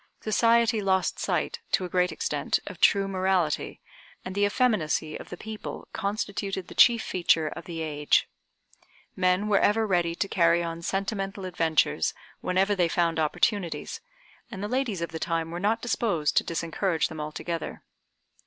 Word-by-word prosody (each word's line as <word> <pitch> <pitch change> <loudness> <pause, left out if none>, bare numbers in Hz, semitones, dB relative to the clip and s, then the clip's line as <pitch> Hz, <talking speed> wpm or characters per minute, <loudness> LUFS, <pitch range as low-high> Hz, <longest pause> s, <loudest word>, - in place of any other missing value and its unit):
Society 230 0 +3
lost 190 -1 +1
sight, - - -1
to 185 - +2
a - - -6
great 180 0 +2
extent, - - -1
of - - -9
true 200 -1 +4
morality, 185 -4 0 0.5
and 185 - -5
the 205 +1 +2
effeminacy 180 -9 +1
of - - -9
the 180 - -7
people 220 +2 -7
constituted 200 -2 -3
the - - -10
chief 235 -2 +6
feature 165 -3 +2
of - - -9
the 165 -2 -5
age. 150 -2 +1 0.9
Men 185 +2 +2
were 205 -2 +4
ever 220 +2 +3
ready 175 -4 +1
to 200 - -1
carry 170 -2 +3
on 165 0 -5
sentimental 195 +1 -3
adventures 165 - +1 0.2
whenever 190 +3 +1
they 180 -4 +2
found 165 -1 +1
opportunities, 175 +3 -1 0.5
and 195 - -6
the - - -1
ladies 235 -7 -1
of 170 - -4
the 160 - -5
time 165 -1 -2
were 175 - -4
not 215 +4 0
disposed 205 -10 0
to - - +5
disencourage 170 +1 -1
them 160 -1 -7
altogether. 160 +2 -5
185 Hz, 160 wpm, -27 LUFS, 165-205 Hz, 0.9 s, chief